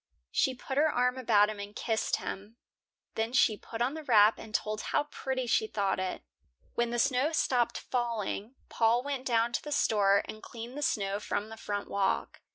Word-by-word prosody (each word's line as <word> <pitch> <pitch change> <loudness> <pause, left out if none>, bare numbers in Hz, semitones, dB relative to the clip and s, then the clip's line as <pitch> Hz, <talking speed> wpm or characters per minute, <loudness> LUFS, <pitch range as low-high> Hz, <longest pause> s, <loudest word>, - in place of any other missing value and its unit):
She 260 - +2
put 265 +2 -5
her 310 +1 +4
arm 250 -1 +2
about 215 -4 +4
him 210 - -8
and 200 +1 -7
kissed 225 -2 0
him. 205 +4 -7 0.6
Then 225 +2 -2
she 255 -4 +4
put 225 +2 -4
on 255 +4 0
the 315 0 -6
wrap 220 -5 +5
and 220 - -10
told 215 0 -1
how - - 0
pretty 265 -3 -3
she 225 -2 +2
thought 200 -3 0
it. 185 - -3 0.5
When 235 0 0
the 240 - -2
snow 265 +4 +2
stopped 250 -6 +1
falling, 235 -1 -3
Paul 230 +2 +2
went 275 -2 -3
down 235 -1 +2
to - - 0
the 295 - -6
store 200 -6 +3
and 215 - -8
cleaned 235 +2 -8
the 295 - -5
snow 200 -7 0
from 210 0 -3
the 225 - -8
front 205 -2 -4
walk. 200 -1 -1
230 Hz, 195 wpm, -30 LUFS, 210-255 Hz, 0.6 s, wrap